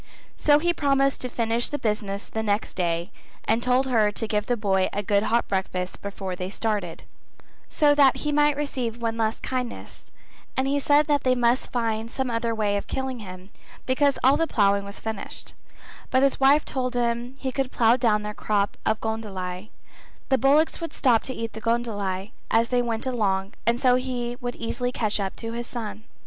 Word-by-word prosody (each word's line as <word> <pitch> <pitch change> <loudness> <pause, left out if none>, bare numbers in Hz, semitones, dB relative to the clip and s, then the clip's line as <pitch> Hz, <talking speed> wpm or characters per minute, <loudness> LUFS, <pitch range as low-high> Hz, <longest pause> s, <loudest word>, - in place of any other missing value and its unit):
So 290 -1 +4
he 345 +3 +1
promised 275 -3 +1
to 250 - -3
finish 230 0 +1
the 290 - -2
business 210 -4 -2
the 220 - -3
next 210 0 -1
day 170 0 -1 0.3
and 225 +2 +2
told 250 +2 +2
her 225 -5 +3
to 225 - -4
give 210 0 -1
the 245 - +1
boy 190 -3 +1
a 205 - -2
good 200 0 +2
hot 235 +2 +1
breakfast 185 -2 -2
before 195 -2 -5
they 180 +1 -4
started, 205 -5 -2 0.7
so 295 -1 +4
that 280 -3 +5
he 300 - -1
might 295 -1 +3
receive 255 -6 -2
one 230 -1 -1
last 225 -1 -1
kindness, 250 -2 -5 0.5
and 265 0 +1
he 285 +1 +1
said 290 +2 +4
that 290 -2 +1
they 255 -1 +3
must 245 +1 +1
find 230 -2 -1
some 260 0 -2
other 230 0 -1
way 205 -2 +1
of 200 - -5
killing 265 -2 -3
him 185 -1 -10 0.3
because 275 +1 +2
all 265 +2 +6
the 330 +1 +1
ploughing 200 -4 +2
was 200 0 -8
finished; 220 -2 -5 0.6
but 260 +1 +3
his 275 - +2
wife 275 +3 +5
told 255 -1 -2
him 240 +1 -1
he 265 -1 -3
could 265 0 -2
plough 230 0 +4
down 220 -4 +2
their 210 0 -4
crop 205 -1 0
of 220 0 +1
goondli, 200 -3 -4 0.6
the 265 - +4
bullocks 295 +6 +3
would 330 - -5
stop 240 -5 +3
to 260 - -5
eat 230 -1 -4
the 220 - -8
goondli 210 -4 -1 0.2
as 230 +1 +3
they 245 -1 +2
went 230 -1 -2
along 200 -6 0
and 235 +1 +3
so 250 -1 +4
he 245 -2 -3
would 245 0 -3
easily 245 +2 -2
catch 215 -4 -1
up 195 -1 -3
his 235 +1 -4
son. 220 -2 -6
230 Hz, 195 wpm, -25 LUFS, 210-260 Hz, 0.7 s, all